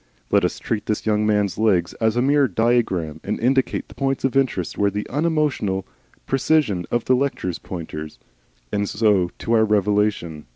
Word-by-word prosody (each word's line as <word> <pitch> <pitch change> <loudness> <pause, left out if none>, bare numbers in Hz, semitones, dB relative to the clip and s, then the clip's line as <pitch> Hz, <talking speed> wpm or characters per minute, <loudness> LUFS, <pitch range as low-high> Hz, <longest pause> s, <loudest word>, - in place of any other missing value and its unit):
Let 100 -2 +4
us 90 - 0
treat 110 -2 -3
this 105 - -2
young 105 -1 +1
man's 105 -2 +1
legs 95 -6 +2
as 110 0 +2
a 120 - +2
mere 140 0 +4
diagram, 110 -11 0
and - - -3
indicate 130 +2 +1
the - - -14
points 135 -1 -1
of 135 0 0
interest 125 - 0
with 100 0 0
the 105 - -3
unemotional 145 - 0 0.4
precision 135 - +1
of 120 -1 -1
a 130 - +4
lecturer's 125 -9 -1
pointer. 80 -3 -6 0.6
And 100 -1 -1
so 105 -5 +2
to 115 - -2
our 110 -1 +5
revelation. 105 -6 0
105 Hz, 170 wpm, -22 LUFS, 95-130 Hz, 0.6 s, our